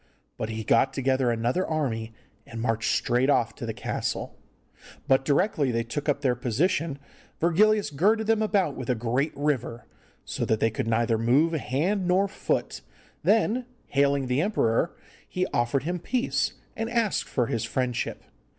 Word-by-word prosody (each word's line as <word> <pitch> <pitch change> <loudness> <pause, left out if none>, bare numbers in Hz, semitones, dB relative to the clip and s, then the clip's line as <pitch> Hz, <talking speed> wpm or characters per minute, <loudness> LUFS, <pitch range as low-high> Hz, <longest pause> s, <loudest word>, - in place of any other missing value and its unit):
But 110 - -4
he 110 0 -4
got 135 +5 +3
together 130 -1 +1
another 120 +9 0
army, 120 -10 -2 0.4
and 115 - -7
marched 115 -1 0
straight 125 0 +1
off 145 - +2
to - - -7
the - - -1
castle. - - -3 0.7
But 135 0 +4
directly 145 0 +2
they 115 -1 0
took 145 +6 -4
up 145 0 +1
their 130 -4 +2
position 140 - 0 0.4
Virgilius 205 +4 +3
girded 210 +10 +2
them 220 0 +2
about 200 -8 +1
with 130 -2 -6
a 125 - +3
great 125 +6 0
river, 140 -5 -1 0.4
so - - -3
that 110 - +1
they 110 - +2
could 110 - -3
neither 115 0 +1
move 135 +9 +3
hand 170 +7 0
nor 185 +2 +3
foot, - - -2 0.4
then, 225 +3 +2 0.2
hailing 140 -1 +2
the 125 +3 +1
emperor, 170 - +1 0.3
he 180 0 -1
offered 120 +3 +1
him 175 +3 -2
peace, 250 +8 0 0.2
and 225 +1 -3
asked 230 -4 0
for 125 - +1
his 115 -1 -2
friendship. 125 -2 -2
140 Hz, 160 wpm, -26 LUFS, 120-180 Hz, 0.7 s, But